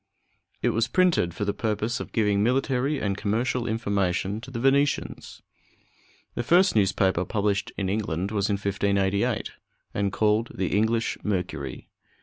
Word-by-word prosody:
It - - +3
was 115 +1 +1
printed 180 - +2
for 105 - -2
the 100 - 0
purpose 110 +2 -1
of - - -7
giving 105 -3 +2
military 130 +4 +1
and 100 -4 -1
commercial 115 +4 -1
information 100 -2 -1
to 130 - -10
the 125 -3 -5
Venetians. 140 +3 0 0.9
The - - -2
first 175 +8 +4
newspaper 95 -3 +2
published 100 0 -1
in 100 - -1
England 95 -2 -2
was 105 -1 0
in 100 - +2
1588, 100 0 0 0.4
and 100 -1 0
called 110 +3 +1
the 95 0 -1
English 110 +2 +1
Mercury. 95 -4 -3
105 Hz, 140 wpm, -26 LUFS, 100-115 Hz, 0.9 s, first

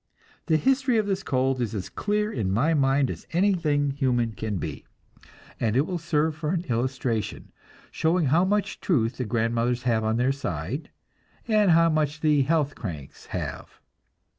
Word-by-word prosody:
The 160 -2 +4
history 260 - +2
of 215 - +2
this 195 -1 -1
cold 130 -4 0
is 115 -2 -2
as 95 - -4
clear 210 +1 -1
in 100 -6 -1
my 135 +12 +2
mind 135 -2 +2
as - - -9
anything 165 -6 +2
human 125 -4 0
can 110 -2 -4
be, - - -5 0.8
and 110 -1 0
it 135 - +5
will 180 -1 -3
serve 160 -2 0
for 155 -1 -3
an 175 0 0
illustration, 120 -2 -2 0.4
showing 165 +1 +1
how 160 +7 +3
much 205 +2 0
truth 120 - 0
the 125 - -2
grandmothers 115 +2 0
have 115 -3 +1
on 110 +1 +1
their 125 +2 +2
side, 120 - -4 0.6
and 215 -3 +3
how 165 0 +5
much 150 -1 0
the 150 -2 +3
"health 145 0 +1
cranks" 80 - -8
have. - - -6
140 Hz, 165 wpm, -26 LUFS, 120-165 Hz, 0.8 s, it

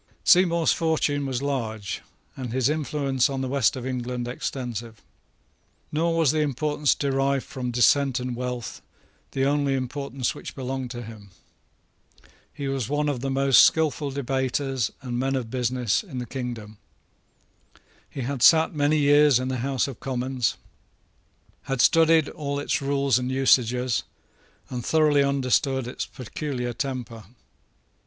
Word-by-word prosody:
Seymour's 170 -2 +4
fortune 150 -4 0
was 130 0 -3
large, 110 -8 -3 0.3
and 125 -3 -5
his 130 +1 +1
influence 140 -3 0
in 135 -1 -3
the 130 - -2
West 135 -2 +2
of 130 -1 -6
England 125 -1 -3
extensive. 120 -3 -5 0.9
Nor 165 +2 0
was 160 -5 +4
the 155 - 0
importance 150 0 +1
derived 135 -1 0
from 125 -2 -5
descent 130 +2 +3
and 125 -1 -4
wealth 125 -1 -5 0.5
the 135 0 +1
only 140 -1 +1
importance 130 0 -3
which - - -9
belonged 130 -1 -4
to 120 0 -6
him. 110 -3 -11 1.2
He 140 - -5
was 135 -4 -2
one 150 +1 0
of 140 -4 -2
the 135 +2 -3
most 135 0 +5
skilful 155 -2 +3
debaters 135 -2 -1
and 120 -2 -3
men 135 +1 0
of 120 -4 -3
business 125 -3 0
in 160 -11 -9
the 125 - -3
kingdom. 120 -5 -6 1.3
He 135 - -6
had 130 +1 -3
sate 160 +4 +6
many 150 0 +2
years 145 -2 +5
in 130 +1 -2
the 130 - -2
House 135 +2 0
of 135 -4 -8
Commons, 130 -3 -2 1.1
had 135 -1 -2
studied 160 +2 +5
all 140 -2 -4
its 145 - -1
rules 140 -2 +1
and 125 +1 -3
usages, 125 -2 +2 0.7
and 125 -2 -5
thoroughly 150 -1 +3
understood 135 -1 +1
its 125 - -5
peculiar 125 -1 -5
temper. 120 -4 -5
135 Hz, 145 wpm, -25 LUFS, 125-145 Hz, 1.3 s, sate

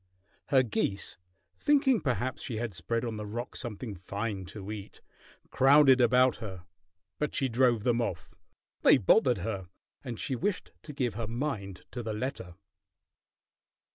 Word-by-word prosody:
Her 130 -2 +4
geese, 100 -5 -2 0.4
thinking 275 -5 +3
perhaps 130 -2 -1
she 115 - -4
had 115 -2 -3
spread 115 +5 -2
on 115 -2 -4
the 105 - -5
rock 120 +4 -5
something 115 -1 -5
fine 100 +2 -4
to 100 +2 -8
eat, 105 -2 -8 0.5
crowded 135 -1 +6
about 125 +1 +4
her, 95 -5 -8 0.5
but 150 - -1
she 135 - +2
drove 120 -2 +2
them 120 0 +2
off. 95 -7 -4 0.5
They - - +7
bothered 125 - +4
her, 100 -5 -3 0.4
and 120 -5 -6
she 135 - -1
wished 195 - -2
to 150 - -9
give 125 -5 -1
her 110 +1 -4
mind 115 -6 -4
to 125 - -4
the 110 -2 -3
letter. 105 -6 -4
120 Hz, 150 wpm, -30 LUFS, 105-130 Hz, 0.5 s, They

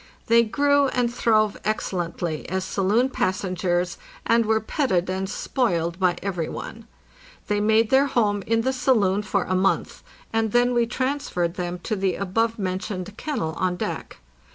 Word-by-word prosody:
They 230 +1 +5
grew 285 +5 +3
and 245 -2 0
throve 215 -3 +2
excellently 175 -6 -2
as 190 +1 -2
saloon 210 +8 +1
passengers, 180 -2 -1 0.3
and 230 -1 +3
were 220 0 +3
petted 195 - 0
and 190 0 -2
spoiled 175 - -1
by 180 -2 +3
every 180 -5 -2
one. - - -8 0.6
They 205 0 +1
made 220 +1 +3
their 270 +2 +5
home 210 -6 +1
in 225 0 +2
the 260 +3 0
saloon 210 -7 +2
for 195 -1 0
a 185 - -2
month, 185 +1 0 0.3
and 225 -1 0
then 245 +1 +3
we 235 -1 +2
transferred 255 -10 -1
them 180 -1 -4
to 220 - -1
the 190 -2 0
above 225 +4 0
mentioned 190 0 -4
kennel 215 - -3
on 185 -1 +1
deck. - - -5
205 Hz, 155 wpm, -24 LUFS, 185-235 Hz, 0.6 s, They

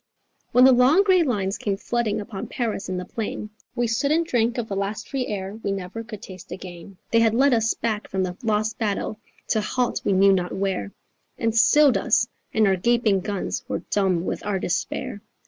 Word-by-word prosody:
_ - - -41
When 250 - +7
the 265 - +8
long 260 +10 +5
grey 375 -3 +4
lines 205 - -1
came 200 -2 -1
flooding 225 -1 -1
upon 205 -2 -6
Paris 220 -6 -3
in 185 - -2
the 180 - -4
plain, 215 +1 -5 0.2
We 240 - +1
stood 230 +5 0
and 330 +2 +2
drank 240 -4 +1
of 235 -2 -2
the 200 - -4
last 200 +2 -3
free 265 -3 -2
air 200 +1 -5
we 200 - -2
never 195 +3 -5
could 220 -3 -9
taste 185 -2 -11
again: 180 0 -9
They 230 - +5
had 225 -1 +3
led 270 +2 +4
us 225 -1 +2
back 220 -2 -2
from 190 0 -1
the 180 -1 -3
lost 215 -1 0
battle, 210 0 -2 0.3
to 220 - +2
halt 250 +3 -1
we 200 - +1
knew 195 +1 +5
not 180 -2 -1
where 190 - -2 0.5
And 225 -1 0
stilled 285 +4 +5
us; - - +2 0.2
and 220 -1 +3
our 190 -1 +3
gaping 230 -1 +2
guns 200 +1 -3
were - - -3
dumb 185 -4 +1
with - - -3
our 205 -1 -1
despair. 185 +2 -3
215 Hz, 210 wpm, -24 LUFS, 195-235 Hz, 0.5 s, the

